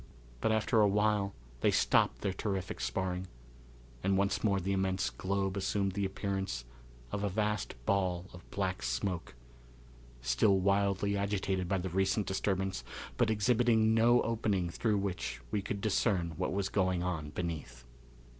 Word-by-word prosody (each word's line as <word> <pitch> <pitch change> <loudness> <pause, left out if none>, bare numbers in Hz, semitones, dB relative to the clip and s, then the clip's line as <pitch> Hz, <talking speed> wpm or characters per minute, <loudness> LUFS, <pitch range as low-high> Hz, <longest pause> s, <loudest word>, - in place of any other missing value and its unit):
But 110 - +1
after 110 +1 +3
a 105 - +6
while 105 -1 +1 0.2
they - - +3
stopped - - +3
their 100 -2 0
terrific 95 -2 -3
sparring, 95 -1 -2 0.7
and 95 0 +2
once 100 +1 +1
more 100 -3 +3
the 95 +2 -2
immense 95 -6 0
globe 95 +8 -1
assumed 100 0 0
the 100 +1 -1
appearance 95 - -3 0.5
of 100 - -2
a 100 - +1
vast 105 0 -1
ball 95 -3 +1
of 90 - -13
black 95 -2 -2
smoke, 65 +7 -2 0.8
still 65 - +3
wildly 100 +1 +2
agitated 95 -2 -1
by 95 - +2
the 95 0 -3
recent 95 +3 +1
disturbance, 95 -5 -1 0.3
but 120 -3 +2
exhibiting 110 0 +3
no 120 +2 +5
opening 105 -6 0
through 105 +3 +1
which 95 -9 -3
we 105 - 0
could 100 +1 -4
discern 95 -5 +1
what 90 +3 -1
was 100 0 0
going 95 -3 +1
on 80 -5 -2
beneath. 80 -6 -5
95 Hz, 150 wpm, -32 LUFS, 90-105 Hz, 0.8 s, a